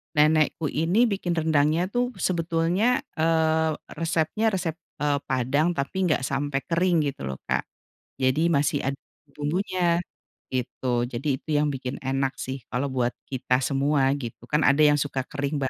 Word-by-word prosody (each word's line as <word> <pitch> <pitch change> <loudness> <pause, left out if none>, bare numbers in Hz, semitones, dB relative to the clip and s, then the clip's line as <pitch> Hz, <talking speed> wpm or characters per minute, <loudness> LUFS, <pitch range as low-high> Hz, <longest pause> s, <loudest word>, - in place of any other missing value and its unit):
nenekku 155 +1 +3
ini 175 +10 +3
bikin 175 -4 -1
rendang 155 -2 +3
nya 175 - +1
tuh 245 +1 +1 0.2
sebetulnya, 175 +6 +1 0.2
eee, 160 0 +3 0.3
resepnya, 165 +5 0
resep, 175 -5 -2 0.2
eee, 145 -1 +2
padang 130 +5 +2
tapi 140 +7 -3
nggak 150 -4 +1
sampai 140 0 -1
kering 175 +1 +2 0.2
gitu - - -15
loh, 65 - -4
Kak, - - +1 0.6
jadi 130 +4 +2
masih 145 0 +2
ada 140 0 -2 0.4
bumbunya 175 +3 0 0.5
gitu 125 -1 -1
jadi 125 +4 -5
itu - - -18
yang 150 - +2
bikin 130 -1 -4
enak 135 +1 0
sih 130 +1 -4 0.2
kalau 135 +3 0
buat 125 -1 0 0.2
kita 130 0 +1
semua 140 +1 +1
gitu 120 -3 -7
kan 150 +1 +3
ada 140 +2 +3
yang 150 -1 +6
suka 140 -2 -1
kering, 145 0 -3
Mbak, 130 - 0
150 Hz, 155 wpm, -25 LUFS, 135-165 Hz, 0.6 s, yang